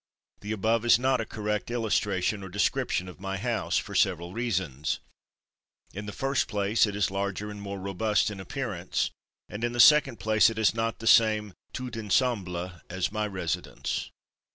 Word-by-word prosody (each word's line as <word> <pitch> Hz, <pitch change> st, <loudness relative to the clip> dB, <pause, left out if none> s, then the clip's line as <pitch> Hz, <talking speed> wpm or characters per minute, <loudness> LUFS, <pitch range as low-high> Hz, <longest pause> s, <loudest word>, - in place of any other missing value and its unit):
The 105 Hz, -, -6 dB
above 110 Hz, +2 st, +1 dB
is 120 Hz, -, +6 dB
not 130 Hz, 0 st, +1 dB
a 115 Hz, -, -5 dB
correct 105 Hz, 0 st, -3 dB
illustration 105 Hz, -4 st, 0 dB
or 95 Hz, -, -7 dB
description 90 Hz, -1 st, 0 dB
of 90 Hz, -, -11 dB
my 95 Hz, 0 st, -3 dB
house, 115 Hz, +2 st, -1 dB
for 100 Hz, -, -3 dB
several 90 Hz, -2 st, +1 dB
reasons. 95 Hz, -, -2 dB, 0.9 s
In 100 Hz, +2 st, -6 dB
the -, -, -4 dB
first 135 Hz, +5 st, 0 dB
place, 105 Hz, +2 st, +2 dB
it 100 Hz, -, -4 dB
is 105 Hz, -2 st, +1 dB
larger 100 Hz, +1 st, -3 dB
and 105 Hz, -1 st, -8 dB
more 100 Hz, -1 st, -5 dB
robust 100 Hz, +2 st, 0 dB
in 100 Hz, -, -7 dB
appearance, 100 Hz, -4 st, -2 dB, 0.4 s
and 105 Hz, +3 st, -7 dB
in 120 Hz, 0 st, 0 dB
the 120 Hz, -, -4 dB
second 140 Hz, -3 st, +6 dB
place 110 Hz, 0 st, +4 dB
it 115 Hz, -, -6 dB
has 110 Hz, -1 st, +3 dB
not 115 Hz, 0 st, -1 dB
the 115 Hz, -, -9 dB
same 110 Hz, -3 st, +4 dB, 0.2 s
tout 125 Hz, -2 st, -5 dB
ensemble 100 Hz, -5 st, 0 dB, 0.2 s
as 95 Hz, +1 st, -1 dB
my 110 Hz, 0 st, -1 dB
residence. 95 Hz, -5 st, -3 dB
105 Hz, 175 wpm, -28 LUFS, 95-115 Hz, 0.9 s, is